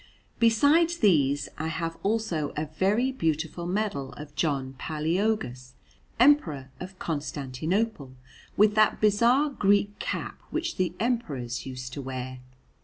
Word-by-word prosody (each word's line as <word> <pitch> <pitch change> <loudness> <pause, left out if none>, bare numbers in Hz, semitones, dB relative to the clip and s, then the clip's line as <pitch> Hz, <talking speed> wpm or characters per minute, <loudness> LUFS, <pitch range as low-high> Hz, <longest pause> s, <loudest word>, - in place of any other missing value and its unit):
Besides 290 +9 +4
these, 145 - +3
I 160 - -2
have 165 +1 -3
also 200 -8 -1
a 155 - 0
very 195 - +1
beautiful 165 - -2
medal 180 -9 -2
of 145 +3 -10
John 140 -3 -1
Palæologus, 155 - -1 0.5
Emperor 160 - +3
of 185 +1 -8
Constantinople, 150 - -2 0.4
with 210 +1 +5
that 215 0 +3
bizarre 235 +8 +3
Greek 205 -3 +2
cap - - -4
which 335 +1 -3
the 180 -2 0
Emperors 145 - -2
used 125 -1 -7
to 140 - -5
wear. 130 -1 -5
165 Hz, 120 wpm, -27 LUFS, 140-220 Hz, 0.5 s, with